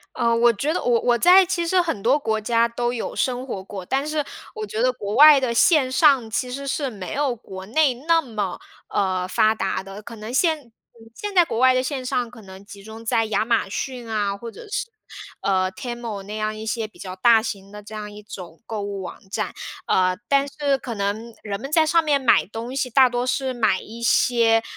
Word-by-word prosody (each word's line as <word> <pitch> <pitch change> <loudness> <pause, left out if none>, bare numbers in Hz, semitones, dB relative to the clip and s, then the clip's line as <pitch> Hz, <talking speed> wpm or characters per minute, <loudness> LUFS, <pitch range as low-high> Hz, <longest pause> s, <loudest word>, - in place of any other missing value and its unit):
呃， 230 0 +2
我 235 +1 +5
觉 280 +8 -2
得 - - -2
我 - - 0
我 235 - +3
我 240 - +3
在 365 +8 +7
其 350 -2 -1
实 360 +2 +3
很 325 - -3
多 255 +5 +4
国 220 -5 -1
家 230 +1 +2
都 240 +1 -2
有 240 -2 -4
生 255 0 -1
活 195 -6 -5
过， 195 -1 -8
但 270 +7 -1
是 305 0 -1 0.3
我 435 -1 -4
觉 225 - -4
得 255 - +3
国 210 -4 -5
外 300 -1 +9
的 255 -3 -1
线 275 +2 +4
上， 265 -5 +4
其 245 +2 -2
实 275 +2 -5
是 275 0 -1
没 195 -7 -7
有 280 -2 0
国 190 -4 -10
内 280 +4 +3
那 325 +7 +2
么， 210 - -4 0.3
呃， 185 -2 0
发 215 +3 +3
达 195 -3 -2
的。 195 +2 -9
可 230 +2 -10
能 215 +3 -7
现 300 -4 +1 0.4
现 415 -1 -5
在 355 -2 +5
国 275 - -4
外 260 0 +6
的 255 - +2
线 260 -1 -4
上 245 -1 -1
可 235 -1 -14
能 190 0 -13
集 200 0 -12
中 220 +2 -11
在 225 0 +2
亚 215 0 0
马 230 -3 +1
逊 245 +2 -5
啊， 205 -2 -1
或 230 +2 -8
者 460 - -12
是， - - -2 0.5
呃 185 -1 +1
，Temu 230 -1 -6
那 205 +2 -7
样 215 0 -2
一 215 0 -7
些 220 0 -2
比 215 - -22
较 185 -1 -7
大 225 +4 +5
型 200 -3 -6
的 210 0 -9
这 215 +1 -10
样 210 -1 -6
一 210 0 -11
种 185 -4 -10
购 220 -2 -4
物 200 -1 -5
网 185 - -7
站。 - - -3 0.3
呃， 185 -1 +2
但 280 0 +3
是 280 -1 0
可 250 -2 -6
能 210 +3 -3
人 200 -2 -4
们 275 +5 -7
在 315 0 +4
上 335 +2 +3
面 295 -2 +2
买 260 -3 +4
东 230 +5 -7
西， 260 -2 -1
大 260 +2 +6
多 245 0 -1
是 260 0 -1
买 220 -6 +1
一 230 +2 -11
些 230 -1 +3
235 Hz, 255 characters per minute, -22 LUFS, 210-270 Hz, 0.5 s, 外